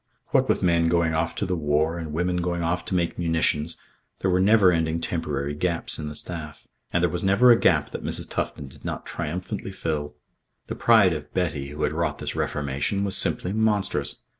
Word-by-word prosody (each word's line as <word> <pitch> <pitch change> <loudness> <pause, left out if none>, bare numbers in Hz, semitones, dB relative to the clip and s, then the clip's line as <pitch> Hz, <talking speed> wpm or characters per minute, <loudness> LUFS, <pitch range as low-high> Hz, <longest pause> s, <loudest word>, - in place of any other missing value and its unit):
What - - +2
with - - +1
men 85 -2 +3
going 85 -1 +2
off 80 +1 -1
to - - -2
the 90 -1 -1
war 80 +1 0
and 80 -2 -5
women 90 +3 0
going 85 -1 -1
off 90 +2 -1
to 95 - -2
make 85 -1 -1
munitions, 80 -1 0 0.4
there 95 - +1
were 90 - +3
never 100 -1 +5
ending 80 -1 0
temporary 75 -4 -2
gaps 85 +2 -1
in 75 -1 -4
the 75 - -8
staff. 75 -2 -6 0.2
And 85 - +1
there 90 - +3
was 90 - -2
never 100 +6 +6
a 115 - +6
gap - - +3
that - - -6
Mrs. - - -2
Tufton 70 - -4
did 65 - -16
not - - -4
triumphantly 90 +3 -4
fill. 75 -5 -3 0.5
The - - -5
pride 105 -6 +5
of 75 -2 -6
Betty, 80 -7 -1
who 75 +2 -5
had - - +1
wrought - - -1
this - - -5
reformation, 70 +8 -1
was 100 -1 +1
simply 90 +1 +1
monstrous. 110 -2 0
85 Hz, 205 wpm, -25 LUFS, 75-90 Hz, 0.5 s, never